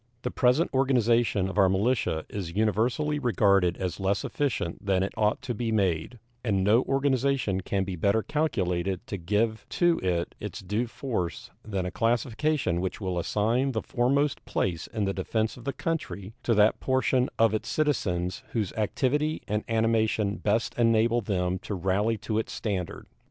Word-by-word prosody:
The 125 - -2
present 130 +7 +2
organization 120 -6 +2
of 95 +2 -2
our 95 -1 +6
militia 95 -4 0
is 90 -4 -6
universally 120 +8 +1
regarded 100 -7 +3
as 90 -2 -3
less 95 +1 0
efficient 130 -12 -2
than 95 -2 +2
it 95 - -3
ought 110 +4 +1
to 125 -1 -2
be 115 0 -2
made, 95 +1 0 0.3
and 100 -5 +1
no 110 +5 +5
organization 135 -7 +1
can 95 +1 -1
be 95 -1 -4
better 100 +6 +1
calculated 95 - -1
to 100 - -4
give 105 +5 0
to 175 -1 +2
it 85 -2 -1
its - - -6
due 105 +6 -1
force 115 - -4
than 100 -4 -3
a 90 - -3
classification 120 - 0
which 95 - -3
will 95 -4 -2
assign 115 +9 +1
the 110 - -2
foremost 140 +4 +1
place 85 -3 -2
in 105 -2 -2
the 95 - -1
defense 110 +4 -1
of 120 - -13
the 140 - 0
country 135 - -4
to 115 - +1
that 105 +1 +4
portion 130 -1 +1
of 115 -1 +4
its 110 - -2
citizens 90 - 0
whose 105 -6 -1
activity 145 +8 0
and 105 +1 -1
animation 110 -2 +1
best 110 +2 0
enable 115 0 +3
them 90 -3 -1
to 100 - -5
rally 100 +5 +1
to 110 +2 -2
its 110 - -4
standard. 95 -6 -3
110 Hz, 165 wpm, -27 LUFS, 95-125 Hz, 0.3 s, our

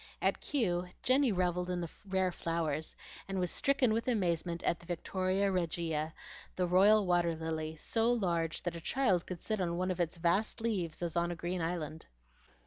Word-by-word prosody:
At - - +1
Kew 180 -10 0 0.2
Jenny 260 -1 +4
revelled 180 -1 0
in 180 -1 -1
the 170 -2 -4 0.2
rare 190 -1 +2
flowers, 160 -3 -2 0.3
and 195 -1 -2
was 180 -1 0
stricken 275 -5 +2
with 230 +3 -1
amazement 170 -7 0
at 170 - +1
the 170 - -16
Victoria 185 +3 0
Regia, 165 -3 -1 0.4
the 180 - +1
royal 200 +4 +5
water 175 -2 +2
lily, 160 -1 -3
so 225 +8 +1
large 170 -8 0
that 175 -1 -2
a 170 - -6
child 195 -6 +1
could 180 -3 -6
sit 215 -3 -1
on 170 -1 -1
one 185 +1 0
of 180 - -4
its 170 0 0
vast 175 +6 +1
leaves 185 -8 -2
as 170 -1 -3
on 170 0 +2
a 175 - -3
green 175 +1 -3
island. 165 -2 -3
180 Hz, 185 wpm, -33 LUFS, 170-195 Hz, 0.4 s, royal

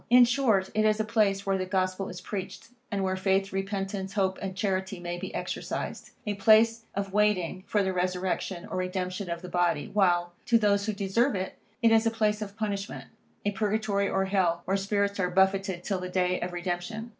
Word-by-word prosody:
In 245 +1 +8
short, 235 -7 +2
it 215 - +2
is 215 0 +3
a - - +2
place 205 -3 +1
where 195 -1 +1
the 185 - -2
Gospel 185 0 -1
is 180 0 -8
preached, 200 +4 -6 0.2
and 200 -2 -1
where 190 0 0
faith, 195 +1 +1
repentance, 195 0 -3
hope 190 -2 0
and 190 -1 -4
charity 190 -1 -1
may 175 0 -4
be 190 +1 -5
exercised; - - -4 0.2
a 210 - -1
place 225 +3 +4
of 195 -1 -3
waiting 205 -4 +1
for 205 -2 +2
the 190 -1 0
resurrection 180 0 -1
or - - -5
redemption 185 +1 -3
of 170 +1 -4
the - - -6
body; 175 -4 0
while, 175 -4 +2
to 235 - +5
those 200 -1 +2
who 215 - 0
deserve 205 +6 +1
it, 190 0 -4 0.2
it 230 - +6
is 225 0 +5
a - - +5
place 215 -1 0
of 205 0 -6
punishment, 200 -2 -4 0.3
a 205 - +2
purgatory 205 -1 0
or 190 - +1
hell, 180 -3 +1
where 190 - +1
spirits 200 0 0
are 180 -1 +1
buffetted 190 -1 +2
till 195 -1 -1
the 180 0 -5
day 180 0 +1
of 180 - -2
redemption. 175 +6 -4
195 Hz, 200 wpm, -28 LUFS, 185-210 Hz, 0.3 s, In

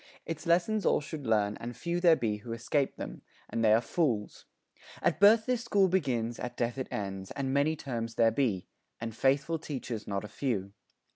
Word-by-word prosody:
Its 165 +1 -5
lessons 180 +5 +2
all - - +3
should 150 -3 -7
learn, 105 -2 +2
And 120 0 -7
few 170 +4 -1
there 175 -2 +6
be 110 -7 -1
who 115 +2 -7
escape 135 +4 0
them - - -7 0.3
and 115 - -2
they 110 - +5
are 110 +2 +5
fools. 120 -5 -1 0.5
At - - +1
birth 215 +3 +7
this 250 -1 0
school 200 -4 +3
begins, 125 -10 0
at 125 - -5
death 120 +2 -1
it 130 - -3
ends, 95 -2 -4
And 135 -1 -2
many 145 +3 +2
terms 115 -6 -4
there 115 -1 +4
be, 110 -7 0 0.3
and 115 -1 -5
faithful 140 +6 +1
teachers 125 -7 -5
Not 100 0 -2
a - - -6
few. 105 -4 -2
125 Hz, 195 wpm, -30 LUFS, 115-160 Hz, 0.5 s, birth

